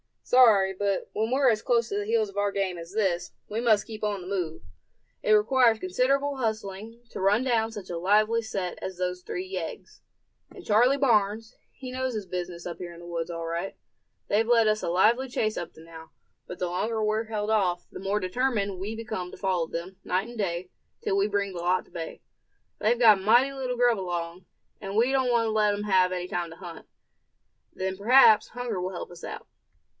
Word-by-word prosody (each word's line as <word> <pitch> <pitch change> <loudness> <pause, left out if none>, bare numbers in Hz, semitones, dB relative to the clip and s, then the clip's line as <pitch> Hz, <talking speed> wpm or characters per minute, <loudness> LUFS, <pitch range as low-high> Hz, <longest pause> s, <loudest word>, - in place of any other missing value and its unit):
"Sorry, 215 -7 +5
but 200 0 -2
when 220 +1 -1
we're 260 0 +4
as 215 -1 -1
close 235 -2 +1
to 200 - -2
the 205 - -2
heels 220 -1 +1
of 200 - -12
our 205 0 +1
game 190 -3 -1
as 170 +2 -9
this, 190 -5 0 0.2
we 215 - -2
must 220 -4 +3
keep 220 -2 -9
on 205 -2 -1
the 180 - -9
move. 180 -5 -3 0.6
It 215 - +3
requires 230 +2 +4
considerable 270 +9 0
hustling 220 -1 -4
to - - -7
run 200 +5 +3
down 230 -3 +1
such 205 -4 -8
a 175 - -3
lively 215 +5 +3
set 195 -5 -4
as 190 -1 -5
those 180 0 -2
three 360 - -5
yeggs. 395 +5 -7 0.5
And 375 - -13
Charley 240 +6 +4
Barnes, 220 -3 +1 0.2
he 255 -2 -8
know 260 +1 -2
his 220 -6 -3
business 175 -1 -5
up 175 -1 -5
here 175 -1 -7
in 170 - -12
the - - -11
wood, 170 -1 -4
all 165 -1 -5
right. 170 +3 -3 0.5
They've 220 +2 +2
led 230 -2 +4
us 215 0 +1
a - - -2
lively 225 +9 +3
chase 215 -3 -1
up 170 - -5
to 160 - -15
now; 160 -1 -12 0.4
but 180 - -8
the 180 - -1
longer 215 +5 -1
we're 215 +1 0
held 215 -1 -3
off, 180 -5 +1
the - - -8
more 200 +2 -1
determined 200 -1 -1
we 210 +4 -4
become 215 -5 -5
to - - -10
follow 185 -4 0
them, 175 +4 -6
night 190 +5 -1
and 240 - -10
day, 180 -3 -3 0.3
till 195 - 0
we 200 +1 +3
bring 200 -1 -1
the 180 - -6
lot 180 +2 +1
to - - -25
bay. 165 -1 -7 0.6
They've 235 +3 +2
got 220 -5 +6
mighty 240 +7 +4
little 260 -2 -3
grub 240 -3 +3
along, 175 -1 -4 0.3
and 195 +1 -6
we 235 +4 +3
don't 265 -2 +2
want 235 -1 +2
to - - 0
let 210 -1 +2
'em 205 - -4
have 185 -3 +3
any 180 0 -4
time 175 -1 -2
to - - -10
hunt. 170 -2 -10 0.9
Then 190 0 -3
perhaps 220 +1 +6
hunger 240 -5 -4
will 185 +1 -3
help 175 - -6
us 175 - -10
out." - - -7
205 Hz, 215 wpm, -27 LUFS, 180-230 Hz, 0.9 s, got